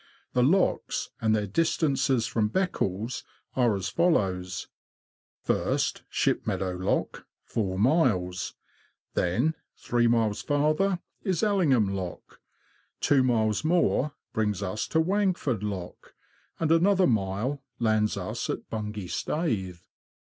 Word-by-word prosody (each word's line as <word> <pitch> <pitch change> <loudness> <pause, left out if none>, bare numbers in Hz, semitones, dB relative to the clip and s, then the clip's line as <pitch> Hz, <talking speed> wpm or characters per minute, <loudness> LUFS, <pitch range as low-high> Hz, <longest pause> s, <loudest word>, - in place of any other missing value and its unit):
The 125 - +3
locks, 180 +10 +1
and 110 -1 +3
their 105 -1 0
dis 160 - +1
tances 135 -6 +1
from 110 -2 +1
Beccles, 115 - -1 0.3
are 120 -5 +3
as 95 -1 -3
follow: 100 - +2 1.0
first, - - 0
Shipmeadow 95 -3 0
Lock, 90 +1 -2 0.2
four 95 -4 -2
miles; 100 - +1 0.6
then, 120 - +1 0.2
three 120 -1 +1
miles 115 -3 +2
farther, 155 +7 +1 0.2
is 185 -4 -1
Elling 200 -7 +3
ham 110 -7 +3
Lock; 90 -3 -7 0.6
two 140 -2 +4
miles 110 -3 +1
more 155 -3 +2 0.2
brings 105 -3 0
us 100 +3 -2
to 160 - +1
Wangford 180 - +1
Lock; 95 -4 -6 0.4
and 160 -1 +1
another 185 +3 +4
mile 110 - 0 0.2
lands 110 -2 +1
us - - -4
at - - -3
Bungay 105 -2 -4
Staithe. 95 - -2
115 Hz, 120 wpm, -27 LUFS, 100-160 Hz, 1.0 s, two